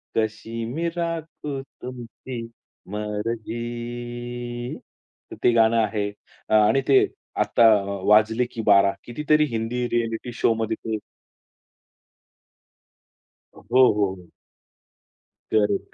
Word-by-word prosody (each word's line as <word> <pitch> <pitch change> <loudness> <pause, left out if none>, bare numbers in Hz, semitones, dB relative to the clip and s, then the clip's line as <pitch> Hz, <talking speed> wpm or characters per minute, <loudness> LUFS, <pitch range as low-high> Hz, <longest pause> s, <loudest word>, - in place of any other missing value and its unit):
कशी 115 +1 -2
मी 160 +9 -2
राखू 160 -4 -4 0.2
तुमची 125 0 -7 0.5
मर्जी. 120 +3 -4 0.5
तर - - -6
ते 120 - +6
गाणं 115 0 +4
आहे. 105 -2 0 0.4
आणि 110 +5 +5
ते 135 -2 +6 0.4
आता 115 - +4
अ, - - -5 0.2
वाजले, 110 +3 +4
की 115 - -6
बारा 100 -1 +5
कितीतरी 150 +4 +2
हिंदी 115 +2 -1
रिएलिटी 115 +1 -1
शोमध्ये 115 -1 +1
ते 110 -1 -1 2.6
a - - -13
हो, 130 +1 +6
हो, 100 -2 +1
हो. 90 -2 -15 1.3
करेक्ट, 105 -1 +1
115 Hz, 100 wpm, -24 LUFS, 110-120 Hz, 2.6 s, ते